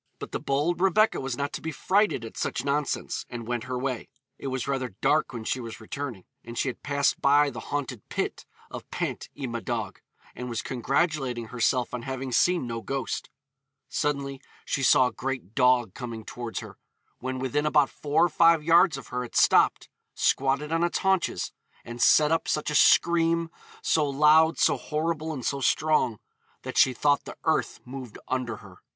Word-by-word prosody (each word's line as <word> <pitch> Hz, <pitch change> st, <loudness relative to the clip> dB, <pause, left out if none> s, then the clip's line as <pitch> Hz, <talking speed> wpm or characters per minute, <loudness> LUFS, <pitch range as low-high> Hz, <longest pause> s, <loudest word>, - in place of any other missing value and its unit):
But -, -, -8 dB
the -, -, -2 dB
bold 150 Hz, +6 st, 0 dB
Rebecca 195 Hz, +3 st, +3 dB
was 130 Hz, -2 st, -3 dB
not 140 Hz, 0 st, -3 dB
to -, -, -5 dB
be 160 Hz, -, -4 dB
frighted 190 Hz, -, +1 dB
at 115 Hz, -, -10 dB
such 125 Hz, -, -2 dB
nonsense, 145 Hz, 0 st, -1 dB
and 120 Hz, -2 st, -6 dB
went 120 Hz, -1 st, -2 dB
her 130 Hz, 0 st, -3 dB
way. 130 Hz, -2 st, -3 dB, 0.3 s
It -, -, -5 dB
was 130 Hz, -1 st, -3 dB
rather 130 Hz, -6 st, -2 dB
dark 155 Hz, 0 st, +2 dB
when 115 Hz, -3 st, -6 dB
she 130 Hz, -, -1 dB
was 115 Hz, -2 st, -7 dB
returning, 120 Hz, -3 st, -6 dB, 0.2 s
and 115 Hz, 0 st, -9 dB
she 135 Hz, -, +1 dB
had 120 Hz, -, -8 dB
passed 140 Hz, -1 st, 0 dB
by 145 Hz, +1 st, +4 dB
the -, -, -7 dB
haunted 135 Hz, -6 st, -3 dB
pit -, -, -3 dB, 0.2 s
of -, -, -8 dB
Pant -, -, -4 dB
y 140 Hz, -, -4 dB
Madog, 115 Hz, -2 st, -4 dB, 0.4 s
and 125 Hz, 0 st, -6 dB
was 115 Hz, -2 st, -3 dB
congratulating 130 Hz, -2 st, -1 dB
herself 125 Hz, +1 st, 0 dB
on 125 Hz, -, -3 dB
having 130 Hz, +1 st, -5 dB
seen 175 Hz, +3 st, +2 dB
no 115 Hz, -1 st, -4 dB
ghost. 135 Hz, 0 st, -4 dB, 0.6 s
Suddenly 140 Hz, -2 st, -2 dB, 0.2 s
she 135 Hz, -, -1 dB
saw 130 Hz, 0 st, +5 dB
a 125 Hz, -, -1 dB
great 130 Hz, -7 st, -4 dB
dog 125 Hz, -5 st, +3 dB
coming 115 Hz, -4 st, -7 dB
towards 120 Hz, -2 st, -5 dB
her. -, -, -11 dB, 0.4 s
When 130 Hz, +1 st, -4 dB
within 140 Hz, +3 st, -1 dB
about 150 Hz, -2 st, +3 dB
four 150 Hz, +3 st, +2 dB
or -, -, 0 dB
five 165 Hz, 0 st, +4 dB
yards 170 Hz, 0 st, +5 dB
of 135 Hz, -, -10 dB
her 125 Hz, 0 st, -2 dB
it 120 Hz, -, -10 dB
stopped, -, -, +4 dB, 0.3 s
squatted 140 Hz, +3 st, +1 dB
on 165 Hz, +1 st, +1 dB
its 175 Hz, -, +1 dB
haunches, 190 Hz, -, 0 dB, 0.3 s
'and 120 Hz, 0 st, -7 dB
set 150 Hz, 0 st, +5 dB
up 165 Hz, -, +1 dB
such 150 Hz, 0 st, -1 dB
a -, -, -3 dB
scream, 165 Hz, +1 st, +4 dB, 0.3 s
so 150 Hz, -3 st, +2 dB
loud, 155 Hz, +3 st, +5 dB
so -, -, +3 dB
horrible, 160 Hz, +1 st, -2 dB
and 130 Hz, -6 st, -5 dB
so 140 Hz, -1 st, -1 dB
strong, 150 Hz, -6 st, +2 dB, 0.5 s
that -, -, -6 dB
she 130 Hz, -, +6 dB
thought 145 Hz, +3 st, +1 dB
the -, -, -9 dB
earth -, -, 0 dB
moved 125 Hz, -3 st, -8 dB
under 125 Hz, -3 st, -2 dB
her.' 95 Hz, -2 st, -15 dB
135 Hz, 185 wpm, -27 LUFS, 125-150 Hz, 0.6 s, she